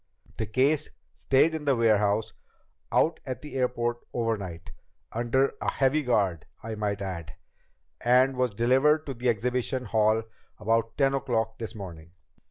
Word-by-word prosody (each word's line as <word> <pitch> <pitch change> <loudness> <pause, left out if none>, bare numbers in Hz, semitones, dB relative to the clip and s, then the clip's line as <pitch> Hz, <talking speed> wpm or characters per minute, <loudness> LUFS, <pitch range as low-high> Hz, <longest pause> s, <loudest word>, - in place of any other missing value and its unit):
The 110 - -1
case 140 +7 +2 0.2
stayed 140 +4 +3
in 155 -2 -4
the 140 -2 +3
warehouse 105 -2 +2 0.6
out 165 - +2
at 130 -1 -6
the 150 - -9
airport 120 -2 0
overnight 100 -8 -3 0.4
under 120 +4 +1
a - - +1
heavy 140 +3 +2
guard, 100 - 0 0.2
I 115 0 -4
might 105 -2 -2
add 90 -4 -6 0.7
and 130 +2 +4
was 125 0 +1
delivered 135 +7 +3
to 135 - -4
the 125 0 -1
exhibition 125 +3 -1
hall 110 0 +2 0.3
about 115 +1 0
ten 135 -1 +3
o'clock 125 -5 -1
this 115 0 -6
morning." 85 -5 -9
120 Hz, 145 wpm, -27 LUFS, 110-130 Hz, 0.7 s, and